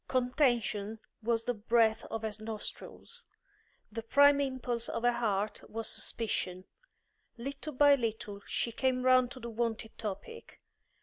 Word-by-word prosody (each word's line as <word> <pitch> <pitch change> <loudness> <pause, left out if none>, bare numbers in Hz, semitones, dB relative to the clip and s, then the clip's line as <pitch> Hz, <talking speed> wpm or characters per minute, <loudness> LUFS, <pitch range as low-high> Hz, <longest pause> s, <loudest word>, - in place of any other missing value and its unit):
Contention 240 -5 +1 0.2
was 230 0 +1
the 245 - 0
breath 225 0 +2
of 225 0 -5
her 220 - -1
nostrils; 225 - -6 0.7
the 230 +2 -4
prime 285 +4 +5
impulse 250 -3 -2
of 230 - -3
her 245 - +5
heart 215 -3 -1
was 225 0 -3
suspicion. 185 -5 -2 0.7
Little 280 +5 -5
by 285 +2 +7
little 220 -5 -2
she 235 - -1
came 255 +1 0
round 255 -1 +5
to 260 - -9
the 235 -1 -6
wonted 225 -1 -2
topic. 230 - -6
235 Hz, 135 wpm, -32 LUFS, 220-255 Hz, 0.7 s, by